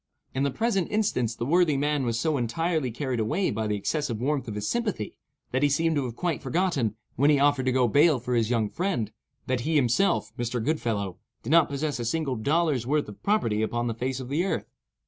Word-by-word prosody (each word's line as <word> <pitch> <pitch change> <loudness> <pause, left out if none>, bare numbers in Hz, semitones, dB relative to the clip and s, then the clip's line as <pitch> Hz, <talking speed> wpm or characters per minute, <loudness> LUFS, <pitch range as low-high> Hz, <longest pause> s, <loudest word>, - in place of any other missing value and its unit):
In 130 - -1
the 140 - +2
present 195 - 0
instance 125 - 0
the 120 - -3
worthy 165 0 +3
man 145 -2 0
was 115 -1 0
so 155 +2 +1
entirely 150 +4 0
carried 125 +1 -3
away 110 - 0
by 110 +1 -2
the 105 - 0
excessive 120 +2 -2
warmth 135 +1 -1
of 110 - -5
his 105 0 -3
sympathy, 210 - -2 0.4
that 130 - 0
he 145 - +4
seemed 165 +3 +1
to 140 -3 0
have 120 -2 -5
quite 170 -2 -2
forgotten, 135 - 0 0.2
when 140 +4 +4
he 150 - +5
offered 140 -2 +2
to - - +4
go 125 -1 +3
bail 145 +4 +4
for 125 +1 -3
his 115 -2 +2
young 115 -3 +1
friend, 175 - -2 0.3
that 130 -1 0
he 160 +6 -1
himself 145 - +2
(Mr. 120 +1 -1
Goodfellow) 110 - -1 0.2
did 120 - -4
not 165 -1 +5
possess 140 -1 -2
a 120 - -3
single 140 +1 -1
dollar's 140 +1 +1
worth 150 +1 +1
of 105 - -12
property 115 - +1
upon 120 +2 -1
the 115 - -1
face 130 +3 -3
of 130 -1 -7
the 150 +5 +1
earth. 195 - -1
135 Hz, 225 wpm, -26 LUFS, 115-160 Hz, 0.4 s, he